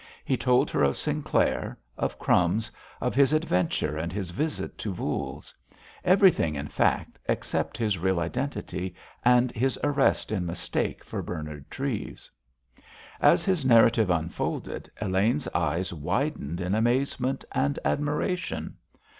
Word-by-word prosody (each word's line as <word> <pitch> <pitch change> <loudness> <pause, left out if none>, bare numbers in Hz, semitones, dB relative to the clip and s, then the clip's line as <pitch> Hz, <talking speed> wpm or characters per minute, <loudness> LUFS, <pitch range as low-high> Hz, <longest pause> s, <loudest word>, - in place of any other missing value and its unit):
He 130 - +2
told 125 0 +2
her - - +1
of 70 -1 +3
Sinclair, - - 0 0.2
of - - -2
"Crumbs," 90 +6 +2 0.3
of - - 0
his 140 +2 +4
adventure 90 - +1
and 85 +1 -3
his 95 -3 -4
visit 150 - -3
to 105 - -3
Voules; 90 - -4 0.5
everything, 180 - +4
in 70 +1 -4
fact, - - 0
except - - -1
his 105 -5 0
real 95 0 +1
identity 90 - -3 0.3
and 125 0 +5
his 130 +4 0
arrest 145 -5 +2
in 100 -4 0
mistake 85 0 -2
for - - -4
Bernard 75 -4 -6
Treves. 130 -5 -4 0.9
As - - +5
his 185 -6 +1
narrative 115 -4 +5
unfolded, 85 -1 -2
Elaine's 105 +8 +1
eyes 85 +2 -1
widened 80 +1 -2
in 90 +2 -1
amazement 130 +3 0
and 140 +1 0
admiration. 150 +5 -1
110 Hz, 130 wpm, -27 LUFS, 85-135 Hz, 0.9 s, and